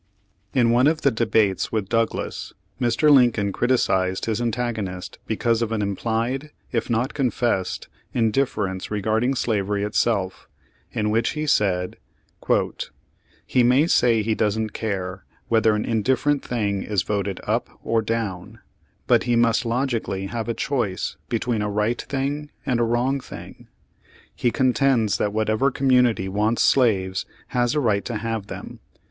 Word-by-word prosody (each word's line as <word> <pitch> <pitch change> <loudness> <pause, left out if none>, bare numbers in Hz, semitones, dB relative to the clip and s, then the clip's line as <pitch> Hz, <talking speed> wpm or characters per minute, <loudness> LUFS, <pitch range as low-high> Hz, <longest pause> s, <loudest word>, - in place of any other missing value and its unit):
In 120 -3 +4
one 125 +3 +4
of 155 0 +1
the 140 - +3
debates 110 -4 +1
with 105 -3 -1
Douglas, 115 +1 -2 0.3
Mr. 140 +5 +3
Lincoln 120 -7 +4
criticised 95 -6 +1
his 115 +1 -1
antagonist 110 -6 -3
because 115 +1 +1
of 115 -1 -1
an 110 -2 0
implied, 115 +8 -2 0.2
if 115 -1 -1
not 120 +3 0
confessed 120 -8 -1 0.2
indifference 110 -5 0
regarding 110 +5 0
slavery 105 -4 0
itself, 105 -2 0 0.4
in 105 -1 -1
which 115 +1 +1
he 155 0 -2
said: 95 -9 +1 1.5
"He 125 - +2
may 125 +5 +4
say 120 -9 +3
he 110 +1 +1
doesn't 110 0 0
care 95 -3 -3 0.3
whether 110 -1 +4
an 105 - -1
indifferent 130 +5 +1
thing 100 -5 -1
is 100 -4 -1
voted 100 -2 -2
up - - -1
or 115 0 +1
down, 110 -2 -3 0.5
but - - +3
he 120 - +2
must 115 +1 +3
logically 115 -6 -1
have 115 +3 -4
a 115 - -1
choice 110 - -2
between 115 -1 -1
a 105 - -1
right 105 +3 0
thing 145 +2 -3 0.2
and 125 -2 +1
a - - +3
wrong 120 +4 +1
thing. - - -11 0.7
He 120 - +1
contends 125 -3 +2
that 105 - +1
whatever 110 +5 +1
community 125 -7 +2
wants 105 +4 +1
slaves 95 -8 +2 0.2
has 120 +2 +1
a - - +2
right 105 -7 +1
to 120 - -3
have 110 -2 -3
them. - - -8
115 Hz, 145 wpm, -23 LUFS, 105-125 Hz, 1.5 s, In